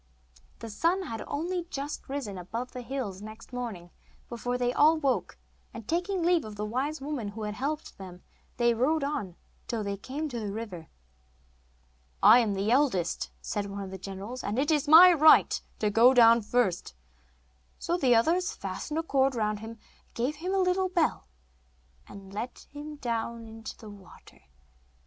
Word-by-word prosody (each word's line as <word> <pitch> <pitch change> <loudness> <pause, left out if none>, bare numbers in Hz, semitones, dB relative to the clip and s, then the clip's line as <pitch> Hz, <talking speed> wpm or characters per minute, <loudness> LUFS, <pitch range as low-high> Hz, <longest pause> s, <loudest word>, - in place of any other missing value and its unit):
The 230 - -8
sun 345 - +1
had 225 -9 -6
only 345 +4 -3
just 280 0 -6
risen 270 -8 -4
above 225 +8 -5
the 250 - -7
hills 235 -7 -5
next 215 +3 -11
morning 215 -9 -6 0.4
before 245 +1 -3
they 245 0 0
all 310 +4 +5
woke, 275 -4 -1 0.4
and, 225 -2 -9
taking 355 +2 -1
leave 345 -1 +3
of 215 -1 -8
the 210 +1 -3
wise 270 +8 -2
woman 275 -5 -4
who 215 +2 -6
had 210 0 -3
helped 285 +2 -4
them, 180 -2 -10 0.3
they 240 -1 +3
rode 280 +6 +1
on 210 - -3 0.3
till 225 -3 -2
they 200 0 -3
came 280 +9 -5
to 240 -3 -4
the 210 -2 -4
river. 200 -7 -7 1.4
'I 215 +5 +9
am 220 -4 +1
the 200 +3 0
eldest,' 245 - +1
said 205 -2 -3
one 200 0 -6
of 190 - -8
the 190 - -7
generals, 200 +7 -7
'and 210 +3 -3
it 290 +4 +1
is 300 -1 +1
my 345 +4 +9
right 315 -1 +5 0.2
to 210 -1 0
go 240 +5 +6
down 230 -1 +7
first.' 205 - -1 0.8
So 345 - -1
the 260 -8 +3
others 355 - +2
fastened 310 -7 -5
a 325 - 0
cord 270 -4 +1
round 215 -2 -1
him, 220 +1 -8
and 230 -1 -11 0.4
gave 260 +6 -1
him 360 +5 -4
a 390 - +1
little 370 0 +1
bell, 345 -3 0 0.8
and 195 -1 -12
let 235 +5 -6
him 300 +1 -8
down 235 -3 -3
into 225 0 -9
the 215 -2 -11
water. 200 -2 -16
245 Hz, 175 wpm, -28 LUFS, 210-295 Hz, 1.4 s, I